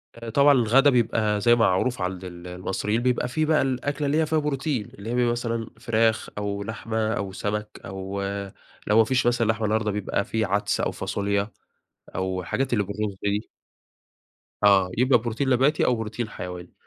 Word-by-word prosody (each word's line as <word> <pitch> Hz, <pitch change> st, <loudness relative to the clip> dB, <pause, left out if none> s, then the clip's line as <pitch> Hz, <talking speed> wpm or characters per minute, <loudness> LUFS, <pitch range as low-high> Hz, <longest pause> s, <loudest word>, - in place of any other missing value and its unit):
آآ 115 Hz, 0 st, -8 dB
طبعًا 140 Hz, +4 st, +5 dB
الغدا 130 Hz, +3 st, +5 dB
بيبقى 110 Hz, -4 st, +1 dB
زي 120 Hz, +1 st, +5 dB
ما -, -, -3 dB
معروف 95 Hz, +5 st, 0 dB
عند 90 Hz, 0 st, -3 dB
ال 90 Hz, -1 st, -9 dB
المصريين، 95 Hz, +5 st, -2 dB
بيبقى 125 Hz, 0 st, +1 dB
فيه 155 Hz, +6 st, 0 dB
بقى 155 Hz, 0 st, +3 dB
الأكلة 135 Hz, +3 st, -1 dB
اللي 150 Hz, +3 st, +1 dB
هي -, -, +2 dB
فيها 155 Hz, 0 st, +1 dB
بروتين، 140 Hz, -5 st, -1 dB
اللي 100 Hz, +3 st, -8 dB
هي 120 Hz, -, -1 dB
بيبقى 120 Hz, -1 st, +2 dB
مثلًا 115 Hz, -1 st, -2 dB
فراخ 115 Hz, -1 st, +1 dB
أو 100 Hz, -1 st, -3 dB
لحمة 110 Hz, 0 st, -2 dB
أو 100 Hz, -3 st, -3 dB
سمك 105 Hz, +2 st, -4 dB
أو 95 Hz, +1 st, -5 dB, 0.7 s
لو 105 Hz, -, +4 dB
ما 115 Hz, -, +8 dB
فيش 130 Hz, +3 st, +1 dB
مثلًا 120 Hz, -2 st, +2 dB
لحمة 110 Hz, 0 st, 0 dB
النهاردة؛ 110 Hz, 0 st, +1 dB
بيبقى 100 Hz, 0 st, -1 dB
فيه 110 Hz, -1 st, -1 dB
عدس 100 Hz, +1 st, 0 dB
أو -, -, 0 dB
فاصوليا 100 Hz, +1 st, -2 dB, 0.6 s
أو 95 Hz, 0 st, -2 dB
الحاجات 130 Hz, +9 st, -2 dB
اللي 105 Hz, -4 st, +2 dB
بالرز 100 Hz, 0 st, -3 dB
دي. 105 Hz, +2 st, -1 dB, 1.2 s
آه، 95 Hz, -3 st, +5 dB
يبقى 125 Hz, 0 st, +4 dB
بروتين 120 Hz, +4 st, -2 dB
نباتي 135 Hz, +5 st, +3 dB
أو 125 Hz, -, +3 dB
بروتين 110 Hz, +1 st, -4 dB
حيواني، 90 Hz, -1 st, -8 dB
110 Hz, 180 wpm, -25 LUFS, 100-125 Hz, 1.2 s, ما